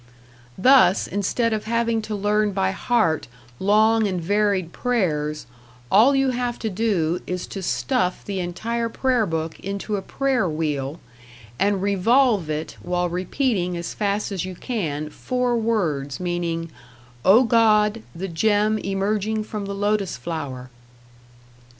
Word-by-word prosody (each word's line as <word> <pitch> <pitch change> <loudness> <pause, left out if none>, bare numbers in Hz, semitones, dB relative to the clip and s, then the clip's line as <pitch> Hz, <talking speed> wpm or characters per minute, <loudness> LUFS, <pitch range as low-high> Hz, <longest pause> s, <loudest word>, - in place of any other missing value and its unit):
Thus 250 -4 +5
instead 220 +4 0
of 215 -1 -3
having 230 0 0
to 215 0 -4
learn 210 +1 +1
by 190 0 +1
heart 195 -6 +1 0.3
long 215 +2 +3
and 185 -2 -2
varied 195 -1 0
prayers, 155 -11 -1 0.5
all 235 +8 +6
you 270 -1 +2
have 245 -1 -2
to 220 - -3
do 180 -5 0
is 180 0 -3
to 195 - -7
stuff 185 0 -1
the 195 -2 -3
entire 230 +7 -2
prayer 245 -2 +1
book 160 -1 -3
into 200 +2 -3
a - - -3
prayer 255 -2 0
wheel, 150 -1 -2 0.6
and 200 -1 +1
revolve 205 - +3
it 155 +1 -4
while 180 0 -1
repeating 180 0 -1
as 170 -1 -5
fast 205 0 -1
as 190 -4 -2
you 185 0 -6
can 155 - -3
four 250 - -1
words 170 - -1
meaning, 170 -2 -2 0.5
"O 220 +7 +6
God, 220 -2 +3
the 190 +3 -4
gem 210 +5 +2
emerging 210 +2 -1
from 210 -2 -5
the 200 - -4
lotus 205 - 0
flower." 130 -3 -6
200 Hz, 140 wpm, -23 LUFS, 175-225 Hz, 0.6 s, all